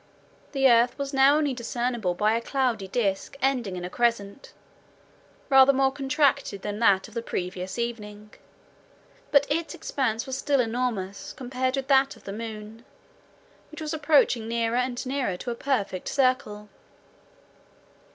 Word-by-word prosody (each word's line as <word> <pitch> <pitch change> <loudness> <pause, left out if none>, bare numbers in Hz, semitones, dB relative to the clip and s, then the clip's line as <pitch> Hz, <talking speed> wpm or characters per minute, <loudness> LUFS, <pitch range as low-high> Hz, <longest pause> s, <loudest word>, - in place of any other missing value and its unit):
The 270 -1 +4
earth 240 0 +4
was 280 0 -4
now 275 +2 +5
only 295 -3 0
discernible 235 -5 -2
by 210 +4 +2
a 230 - 0
cloudy 240 -6 -1
disc 200 +4 -2
ending 250 -8 0
in 180 -1 -5
a - - -5
crescent, 235 -1 -1 1.0
rather 270 0 +7
more 270 0 +2
contracted 275 -6 0
than 205 0 -4
that 195 -4 +3
of - - -16
the 230 - -3
previous 185 -2 -5
evening; 210 -3 -5 1.0
but 285 -1 +4
its 330 +3 -2
expanse 255 -8 -2
was 265 -1 -4
still 275 +1 +1
enormous, 225 -5 -2
compared 255 +1 -2
with 270 -1 -4
that 270 0 +4
of - - -19
the 195 - -6
moon, 220 0 -8 0.9
which 310 - -10
was 310 -1 -4
approaching 285 -7 +2
nearer 230 0 0
and 250 0 -2
nearer 255 -8 -2
to 240 - -5
a - - -1
perfect 220 -8 -2
circle. 255 -6 0
245 Hz, 150 wpm, -26 LUFS, 210-270 Hz, 1.0 s, rather